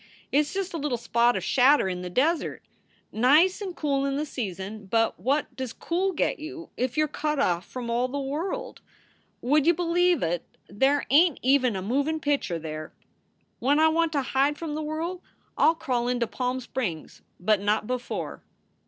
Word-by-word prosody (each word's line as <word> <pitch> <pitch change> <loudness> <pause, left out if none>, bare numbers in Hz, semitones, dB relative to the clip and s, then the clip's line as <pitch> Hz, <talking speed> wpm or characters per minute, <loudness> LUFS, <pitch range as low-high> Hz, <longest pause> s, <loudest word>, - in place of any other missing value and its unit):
It 285 - +4
s 295 -1 -1
just 390 -2 -2
a 330 - -3
little 280 -4 -1
spot 235 +1 +2
of - - -4
shadder 270 -3 +4
in 180 -1 -3
the 180 - -5
desert. 295 - 0 0.5
Nice 300 - +4
and 375 -3 -5
cool 280 -2 0
in 275 0 -1
the 295 +2 -1
season, 205 - -6
but 225 0 +1
what 265 +5 0
does 260 -3 -5
cool 370 +3 -1
get - - 0
you 335 +2 -8
if 255 +1 -2
you 310 - +4
re 300 - -10
cut 300 0 -1
off 175 -8 0
from 250 -2 -6
all 240 +2 +1
the 270 +3 -5
world? 345 - -4 0.6
Would 290 +4 +2
ya 340 - +7
b 350 +2 -3
lieve 350 - +2
ut, 170 +1 0 0.3
there 270 +9 +1
ain 315 +1 +5
t - - -16
even 255 -3 +3
a 190 - -3
movin 285 +9 0
pitcher 285 - 0
there. 155 -1 -7 0.7
When 285 +4 +2
I 320 0 +6
want 330 0 +1
to 280 -2 +1
hide 275 +3 +1
from 325 -3 -5
the 310 - -3
worl 325 +4 -4 0.3
I - - +4
ll 325 - +1
crawl 250 -7 -1
into 245 -1 +1
Palm 250 +2 -2
Springs, 210 - -5 0.2
but 195 +2 +2
not 210 +1 +1
before." 250 +1 -4
275 Hz, 195 wpm, -26 LUFS, 235-310 Hz, 0.7 s, ya